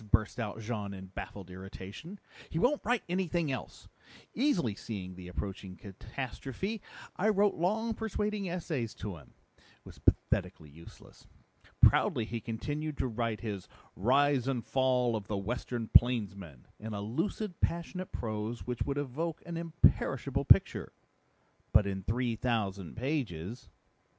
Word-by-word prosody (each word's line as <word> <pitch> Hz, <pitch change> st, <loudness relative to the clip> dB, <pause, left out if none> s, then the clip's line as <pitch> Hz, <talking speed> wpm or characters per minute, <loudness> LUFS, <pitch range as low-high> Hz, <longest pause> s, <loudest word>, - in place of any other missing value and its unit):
burst 110 Hz, +4 st, +2 dB
out 110 Hz, -1 st, -3 dB
Jean 105 Hz, -3 st, -3 dB
in 95 Hz, 0 st, -7 dB
baffled 95 Hz, -1 st, -7 dB
irritation. 95 Hz, -, -8 dB, 0.3 s
"He -, -, -3 dB
won't 255 Hz, -, +3 dB
write 245 Hz, -1 st, +2 dB
anything 175 Hz, -4 st, +1 dB
else! 130 Hz, -, -6 dB, 0.5 s
Easily 210 Hz, -, +2 dB
seeing 100 Hz, -3 st, -5 dB
the 90 Hz, 0 st, -9 dB
approaching 95 Hz, +1 st, -5 dB
catastrophe, 130 Hz, -, -5 dB, 0.4 s
I 205 Hz, +4 st, +3 dB
wrote 205 Hz, -1 st, +4 dB
long 220 Hz, +7 st, +1 dB
persuading 210 Hz, -3 st, -1 dB
essays 155 Hz, -10 st, -2 dB
to 100 Hz, -4 st, -5 dB
him. 75 Hz, -, -17 dB, 0.2 s
It -, -, -26 dB, 0.2 s
was -, -, -12 dB
pathetically 75 Hz, -2 st, +1 dB
useless. 85 Hz, +3 st, -14 dB, 0.5 s
Proudly 115 Hz, -, +6 dB
he 115 Hz, 0 st, -4 dB
continued 145 Hz, +7 st, -3 dB
to -, -, +1 dB
write 115 Hz, -2 st, -1 dB
his 100 Hz, -5 st, -4 dB, 0.3 s
Rise 135 Hz, +4 st, +4 dB
and 125 Hz, -4 st, 0 dB
Fall 125 Hz, -3 st, +3 dB
of 105 Hz, -2 st, -4 dB
the 105 Hz, -, -1 dB
Western 115 Hz, +3 st, -2 dB
Plainsman 100 Hz, -, +3 dB
in 110 Hz, 0 st, -5 dB
a 100 Hz, -, -3 dB
lucid, 170 Hz, -, -2 dB
passionate 175 Hz, +2 st, -1 dB
prose 110 Hz, +1 st, -3 dB
which 125 Hz, -1 st, -3 dB
would 140 Hz, 0 st, 0 dB
evoke 150 Hz, +4 st, -2 dB
an 170 Hz, -1 st, -5 dB
imperishable 165 Hz, 0 st, +2 dB
picture -, -, +5 dB, 0.8 s
but 105 Hz, -1 st, +7 dB
in 95 Hz, -1 st, -2 dB
three 120 Hz, +4 st, 0 dB
thousand 100 Hz, -7 st, -1 dB
pages." 120 Hz, -, -2 dB
120 Hz, 140 wpm, -32 LUFS, 100-165 Hz, 0.8 s, but